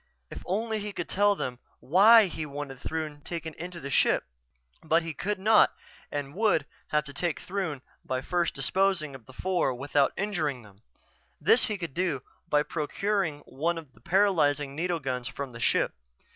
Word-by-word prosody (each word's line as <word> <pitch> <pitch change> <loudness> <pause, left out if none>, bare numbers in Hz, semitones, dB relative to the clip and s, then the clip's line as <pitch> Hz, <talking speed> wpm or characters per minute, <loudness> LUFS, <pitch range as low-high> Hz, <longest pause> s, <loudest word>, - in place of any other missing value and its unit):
If - - -7
only 220 +3 -1
he 205 0 -5
could 175 - -4
tell 205 +1 +3
them 125 -9 -4 0.2
why 210 - +7
he 160 -3 -4
wanted 140 -2 -6
Throon 155 0 -4
taken 165 0 -5
into 175 +1 -7
the 140 -3 -6
ship... - - +3 0.6
But 165 +1 +3
he 165 -1 -4
could 205 +7 -2
not 215 +3 +5 0.4
and 145 -1 -4
would 205 -7 +2 0.2
have 150 0 +1
to 140 -1 -10
take 170 +2 -1
Throon 175 -8 -3 0.2
by 130 0 -2
first 175 +4 0
disposing 170 +1 +1
of 130 -4 -12
the 130 - -13
four 180 -4 0
without 140 +2 +2
injuring 155 - -1
them. 100 -1 -18 0.6
This 220 +9 +5
he 215 - -2
could 170 -7 -5
do 165 -7 -1 0.3
by 150 0 +3
procuring 165 0 -1
one 165 +7 -2
of 155 -6 -9
the - - -22
paralyzing 150 -6 +2
needle 170 +2 -1
guns 125 -4 -3
from 135 +2 -5
the 115 - -10
ship. - - +2
160 Hz, 175 wpm, -28 LUFS, 140-190 Hz, 0.6 s, why